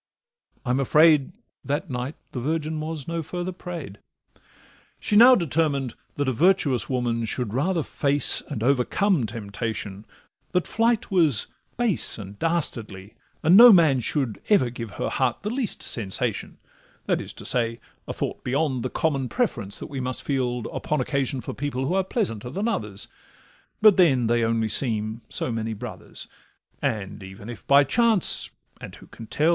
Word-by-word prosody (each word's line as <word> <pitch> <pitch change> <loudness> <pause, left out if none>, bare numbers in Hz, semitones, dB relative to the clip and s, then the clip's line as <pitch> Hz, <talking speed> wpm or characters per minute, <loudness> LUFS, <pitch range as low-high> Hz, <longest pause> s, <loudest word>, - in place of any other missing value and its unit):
I'm 125 +1 +1
afraid 150 +1 +4 0.3
That 145 +5 -3
night 125 +4 -4 0.2
the 125 - -4
Virgin 155 +3 -2
was 155 -2 -5
no 170 0 -2
further 175 +3 -4
pray'd. 170 - -8 1.0
She 210 - -1
now 245 +4 +9
determined 150 - 0 0.2
that 145 -1 -1
a - - +2
virtuous 150 -2 +2
woman 120 -3 -1
Should 110 -1 -3
rather 165 +6 0
face 140 0 +2
and 120 -7 -4
overcome 140 - +2
temptation, 105 -2 -5 0.5
That 180 -1 +1
flight 230 -1 0
was 155 - +3 0.3
base 235 -6 0
and 100 -1 -9
dastardly, 115 - -2 0.3
and 165 +4 +6
no 240 +3 +11
man 160 -9 +5
Should 125 -2 -2
ever 130 - +4
give 115 -2 -6
her - - -3
heart 130 +3 -1
the 210 - -2
least 245 -3 -3
sensation; 100 -5 -2 0.5
That - - 0
is - - -7
to - - -10
say, 115 -2 +1 0.3
a - - -3
thought - - -4
beyond 135 0 0
the - - -3
common 135 -5 -1
Preference, 115 - -2
that - - -6
we 140 - -6
must 130 -1 -3
feel 125 -3 -1
upon 150 - -2
occasion 135 0 -1
For - - -6
people 135 -2 -3
who 160 - -1
are 190 0 +2
pleasanter 125 - -2
than 200 - -2
others, 105 - -3 0.8
But 215 -3 +7
then 140 -10 +4
they 120 0 +2
only 115 0 +1
seem 110 -1 0
so - - -2
many 115 0 -3
brothers. 105 - -8 0.5
And 100 -2 -3
even 95 +3 -10
if 120 - -12
by 140 +1 +7
chance—and 225 - +1
who - - -15
can 115 - -12
tell? 155 +8 +1
135 Hz, 160 wpm, -24 LUFS, 115-165 Hz, 1.0 s, no